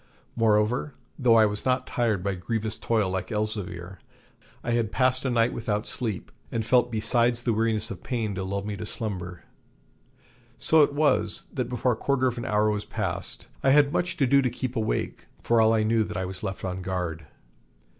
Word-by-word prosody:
Moreover, 115 +5 +1 0.2
though 120 -4 +5
I 110 -1 +7
was 105 0 -1
not 130 0 +1
tired 110 -8 0
by 100 0 0
grievous 110 +3 -3
toil 110 -5 +1
like 95 -1 -3
Elzevir, 95 -4 -4 0.6
I 120 - -2
had 115 -2 0
passed 130 0 +1
a - - +2
night 120 -1 +2
without 105 -1 -2
sleep, 110 -7 -4 0.2
and 115 -2 -2
felt 125 0 +3
besides 120 +2 +2
the 120 - +1
weariness 110 0 0
of 90 - -7
pain 115 -5 -2
to 95 0 -3
lull 100 +1 -3
me 105 -1 -3
to 105 - -5
slumber. 90 -6 -5 1.1
So 160 +6 +5
it 145 - +3
was, 135 -8 +2
that 125 -3 -2
before 125 0 +1
a - - 0
quarter 130 +3 0
of 125 -1 0
an - - -5
hour 105 0 +2
was 105 0 -2
past, - - -4
I 135 - +3
had 145 +1 +5
much 175 -1 -1
ado 140 0 +4
to 130 - +1
keep 125 +1 -4
awake, 110 - -2
for 115 -1 +3
all 110 0 +5
I 110 -1 +2
knew 110 0 +2
that 105 -1 -6
I 95 - -1
was 90 0 -7
left 95 0 -4
on 95 0 -3
guard. 90 -4 -4
110 Hz, 195 wpm, -26 LUFS, 105-125 Hz, 1.1 s, I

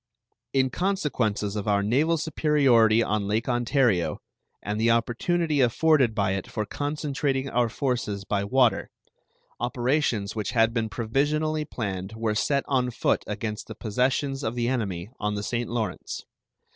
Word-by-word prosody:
In 130 -1 +2
consequences 125 - -1
of 105 0 -3
our 100 -1 +2
naval 145 +10 +2
superiority 135 -8 +3
on 105 -2 -1
Lake 110 +3 0
Ontario 120 - +1 0.5
and 105 +1 -2
the 115 - +3
opportunity 145 +7 +1
afforded 130 -1 +3
by 100 -3 +1
it 95 -1 -3
for 105 - -3
concentrating 145 -1 -2
our 120 -1 +2
forces 120 -6 -2
by 100 0 0
water, 125 +3 +2 0.7
operations 120 -3 0
which 105 -1 -3
had 115 -1 +3
been 115 -2 -1
provisionally 150 +7 0
planned 100 -6 -4
were 110 -1 -1
set 140 +6 +1
on 130 -2 +1
foot 120 - 0
against 105 0 -4
the - - -8
possessions 130 +5 -1
of 110 +2 -2
the 120 -1 0
enemy 100 -6 -2
on 105 0 -1
the 100 - -3
St. 120 +1 -2
Lawrence. 115 -2 -3
120 Hz, 145 wpm, -26 LUFS, 105-135 Hz, 0.7 s, superiority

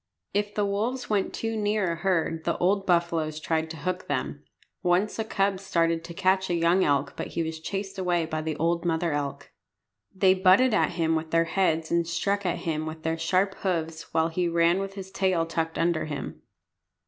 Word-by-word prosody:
If 205 0 -1
the 210 - +1
wolves 225 +5 -2
went 200 -2 +1
too 225 0 -3
near 210 -3 +1
a - - -2
herd 165 -3 0
the 170 - 0
old 195 +2 +1
buffaloes 170 -3 +1
tried 160 0 -1
to 160 - -7
hook 180 +5 -3
them. - - -3 0.4
Once 185 +5 +1
a - - +1
cub 195 -2 0
started 165 -3 0
to 170 - -8
catch 190 +1 +2
a 175 - +1
young 170 +3 +3
elk, 140 -1 +1
but - - -4
he 165 - +2
was 160 0 -4
chased 195 +3 -4
away 175 -2 +1
by 155 -1 -3
the 155 0 -3
old 170 +1 +1
mother 170 -1 0
elk. 145 -1 -4 0.6
They 190 -1 +4
butted 190 +6 +5
at 210 - +2
him 165 -1 +1
with 160 0 -2
their 165 +1 +3
heads 165 -3 0
and 170 -1 +2
struck 200 +3 0
at 175 - 0
him 155 -1 -1
with 155 0 -7
their 160 0 -1
sharp 185 +4 +1
hoofs, 165 -4 -3
while 160 0 +2
he 175 +2 0
ran 170 +2 +3
with 195 0 -5
his 190 -1 -8
tail 185 -4 +1
tucked 165 0 -2
under 170 -1 +1
him. 145 -3 -6
170 Hz, 205 wpm, -27 LUFS, 160-195 Hz, 0.6 s, butted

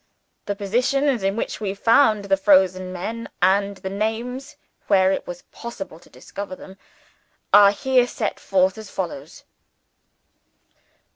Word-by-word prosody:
The 205 - -1
positions 250 +5 0
in 195 +1 0
which 225 - -4
we 200 -2 -3
found 220 -1 +3
the 195 -1 +3
frozen 190 -2 +3
men, 225 +6 -5
and 200 +1 +2
the 190 - -6
names, 225 +6 -3 0.3
where 190 -1 +4
it - - -3
was 175 0 -8
possible 195 -8 -8
to - - -21
discover 200 -2 -8
them, 190 +1 -13 0.8
are 205 -1 +9
here 250 +3 +2
set 220 -3 -3
forth 190 +1 +1
as 215 -2 -10
follows."... 160 -7 -6
200 Hz, 135 wpm, -22 LUFS, 190-230 Hz, 0.8 s, are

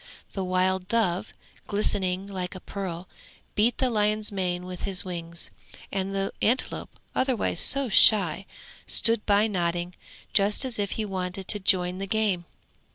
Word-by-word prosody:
The 195 - -2
wild 185 0 +1
dove, 205 -3 0 0.4
glistening 195 -2 0
like 190 -1 -5
a - - -6
pearl, 180 -2 -5 0.5
beat 220 +3 +2
the 260 -2 +1
lion's 215 -1 +1
mane 180 -2 -2
with 180 -1 -7
his 195 -2 0
wings; 170 -2 -5 0.4
and 195 0 -2
the 195 0 -1
antelope, 240 +5 +1 0.2
otherwise 255 -9 0
so 275 0 +3
shy, 195 -4 +5 0.4
stood 230 -2 +4
by 205 +1 +5
nodding, 175 -3 -1 0.4
just 205 +5 +2
as 245 -4 -3
if 200 -1 0
he 220 - -2
wanted 185 -1 -4
to 210 - +3
join 185 -1 +2
the 195 - -4
game. 200 -4 +1
195 Hz, 150 wpm, -27 LUFS, 180-210 Hz, 0.5 s, shy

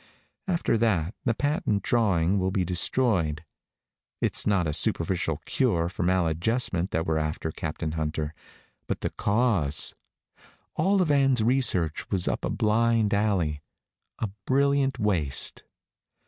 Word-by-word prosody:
After 170 -10 0
that 95 -6 +1
the 115 -3 +1
patent 145 - -1
drawings 100 -6 +1
will 95 0 0
be 95 -1 -1
destroyed. 85 - +1 0.7
It's - - +1
not 100 -4 +2
a 75 - -2
superficial 85 0 0
cure 85 -11 0
for 95 - -7
maladjustment 90 +3 +1
that 80 -2 -2
we're 80 -1 0
after, 75 +1 -3
Captain 80 0 -4
Hunter, 80 -1 -3 0.5
but - - -3
the - - -2
cause. 100 - 0 0.8
All 195 0 +2
of 155 - 0
Ann's 135 -5 +3
research 110 - +1
was 95 -3 0
up - - -2
a - - -1
blind 110 0 +1
alley 95 -8 0 0.6
a 110 -4 -3 0.2
brilliant 140 -1 +2
waste." 90 - +1
95 Hz, 130 wpm, -26 LUFS, 80-115 Hz, 0.8 s, Ann's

